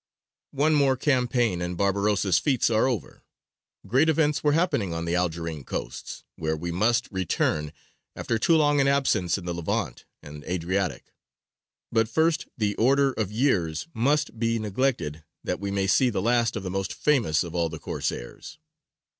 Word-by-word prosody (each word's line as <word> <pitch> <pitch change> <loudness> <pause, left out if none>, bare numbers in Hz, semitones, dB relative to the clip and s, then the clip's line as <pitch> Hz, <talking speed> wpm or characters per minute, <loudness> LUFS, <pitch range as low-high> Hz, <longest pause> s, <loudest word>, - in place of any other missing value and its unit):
One 150 +3 +3
more 140 -3 +3
campaign 125 - +1
and 90 0 -3
Barbarossa's 100 -2 +2
feats 125 - +1
are 110 +3 +3
over. 115 - -4 0.6
Great 135 +10 +3
events 150 -2 +1
were 150 -1 +3
happening 145 - 0
on 85 0 -3
the 85 - -2
Algerine 85 -4 -2
coasts, - - -6
where 80 0 -2
we 85 +2 -4
must 110 +7 +1
return 80 -5 -1 0.4
after 115 - -2
too 165 - +3
long 145 -2 +3
an 135 - +2
absence 120 -11 +2
in 95 - -9
the 90 - -2
Levant 85 -1 -3 0.2
and 75 0 -10
Adriatic: 90 -3 -2 0.8
but 115 -1 +2
first 160 +5 +1
the 105 -3 0
order 135 +3 +3
of 105 -5 -3
years 105 - 0
must 135 0 0
be 115 0 +1
neglected 105 - -1 0.2
that - - -2
we 100 0 -3
may 100 -1 0
see 125 +6 +3
the 105 - -2
last 120 +2 +1
of 105 - -4
the 90 - -4
most 95 -1 -3
famous 115 - +2
of 85 -1 -8
all 85 -2 0
the 80 - -7
Corsairs. - - -5
105 Hz, 165 wpm, -26 LUFS, 85-130 Hz, 0.8 s, One